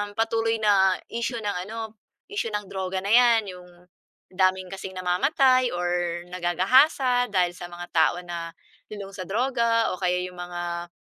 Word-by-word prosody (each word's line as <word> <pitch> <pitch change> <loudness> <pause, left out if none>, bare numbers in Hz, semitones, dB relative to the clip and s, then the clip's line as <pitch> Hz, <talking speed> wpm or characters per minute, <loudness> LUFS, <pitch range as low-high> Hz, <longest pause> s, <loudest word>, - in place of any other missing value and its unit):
patuloy 225 0 +1
na 195 -3 +4 0.2
issue 235 0 -2
ng 190 -3 -3
ano, 225 0 -6 0.3
issue 410 - -3
ng 210 -1 -3
droga 190 0 -4
na 205 - +2
‘yan. 235 -2 +5
Yung 180 0 -13 0.7
daming 185 0 +1
kasing 190 -1 -7
namamatay 255 - +3
or 175 -2 -2 0.5
nagagahasa 245 - +3
dahil 180 -3 +1
sa 175 -1 -9
mga 175 0 -8
tao 165 +1 +3
na 170 -1 -5 0.4
lulong 200 -2 -8
sa 190 - -7
droga 230 0 +1
o 185 - -7
kaya 180 0 0
yung 180 0 -9
mga 175 -1 -5
195 Hz, 150 wpm, -25 LUFS, 180-230 Hz, 0.7 s, yan